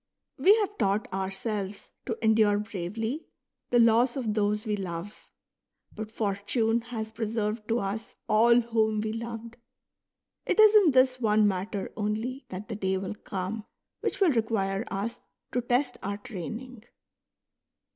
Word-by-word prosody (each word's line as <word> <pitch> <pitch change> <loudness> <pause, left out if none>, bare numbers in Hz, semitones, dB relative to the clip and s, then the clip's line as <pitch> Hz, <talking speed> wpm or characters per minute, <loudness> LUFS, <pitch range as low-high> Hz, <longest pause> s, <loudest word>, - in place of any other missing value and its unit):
We 405 +3 +7
have 415 -2 -2
taught 200 +2 +1
ourselves 195 +1 -3 0.2
to 230 -3 -2
endure 215 -2 +4
bravely 220 - -4 0.4
the 245 - +3
loss 235 +3 +4
of 230 -5 -1
those 210 0 0
we 210 -1 0
love; 185 0 -6 0.6
but 215 0 -6
Fortune 220 +2 0
has 220 -2 -4
preserved 220 -1 -2
to 230 - +1
us 200 +3 -4
all 235 +3 +5
whom 220 -2 +1
we 215 0 -2
loved. 230 0 -6 0.9
It - - +1
is 430 -1 +8
in 410 -6 +7
this 255 0 +4
one 215 -2 +4
matter 195 +1 -2
only 220 +5 -3
that 190 +3 -6
the 220 - -4
day 190 -2 0
will 190 +2 -4
come 200 +1 -5 0.4
which - - -2
will 380 -5 +5
require 220 -4 0
us 205 +4 -3 0.3
to 245 - 0
test 245 +1 0
our 200 +1 -3
training. 225 +3 -7
220 Hz, 145 wpm, -28 LUFS, 205-235 Hz, 0.9 s, is